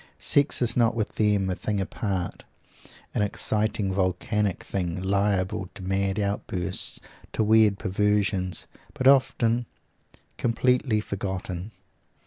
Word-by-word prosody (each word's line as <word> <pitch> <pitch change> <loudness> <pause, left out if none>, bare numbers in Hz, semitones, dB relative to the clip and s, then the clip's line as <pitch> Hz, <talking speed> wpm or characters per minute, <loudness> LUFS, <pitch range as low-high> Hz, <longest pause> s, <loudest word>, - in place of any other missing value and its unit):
Sex 145 -2 +3
is 120 - +1
not 115 -1 +3
with 110 -2 -1
them 105 -3 +2
a 95 - 0
thing 105 +2 -2
apart, 95 -1 -3 0.7
an - - 0
exciting 105 -1 0
volcanic 95 +2 0
thing, 90 -2 -3
liable 95 -1 0
to 100 - -6
mad 95 +1 0
outbursts, 100 -2 -1 0.3
to 110 - +1
weird 110 -2 +4
perversions, 100 -2 0 0.3
but 130 - -3
often 120 -3 +3 0.7
completely 120 -1 +2
forgotten. 95 -2 -4
100 Hz, 115 wpm, -26 LUFS, 95-110 Hz, 0.7 s, weird